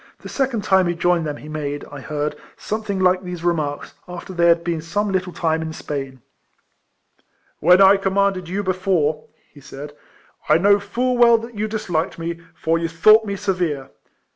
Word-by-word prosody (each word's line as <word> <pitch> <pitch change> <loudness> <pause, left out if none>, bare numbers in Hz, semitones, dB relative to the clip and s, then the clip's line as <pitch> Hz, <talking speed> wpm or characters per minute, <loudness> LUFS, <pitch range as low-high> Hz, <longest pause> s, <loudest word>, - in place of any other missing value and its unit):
The - - -9
second 260 -6 -1
time 190 -3 +3
he 175 - -1
joined 175 -1 +1
them 145 -1 -4
he 150 - -12
made, 145 -2 -4
I 145 - -8
heard, 150 +1 -3 0.2
something 215 -2 -3
like 185 0 +3
these 180 -2 -7
remarks, 155 -4 -2
after 180 +1 -8
they 170 -1 +3
had 170 0 +4
been 170 -2 -2
some 205 +6 -2
little 185 -1 -1
time 160 -2 -1
in 160 0 -5
Spain: 135 -5 -6 0.7
— - - -43
When 180 +2 +5
I 195 +1 +7
commanded 195 -2 0
you 200 +3 -2
before/' 185 -5 0 0.3
he 145 - -15
said, 145 +2 -9 0.3
" - - -26
I 155 - +6
know 200 +4 +4
full 245 +5 -1
well 235 -1 +7
that 230 +1 -8
you 215 0 -2
disliked 180 -7 -2
me, 165 0 -4 0.2
for 165 +1 0
you 165 - -1
thought 215 +7 +5
me 200 -1 -3
severe. 175 -9 -2
175 Hz, 190 wpm, -21 LUFS, 160-200 Hz, 0.7 s, I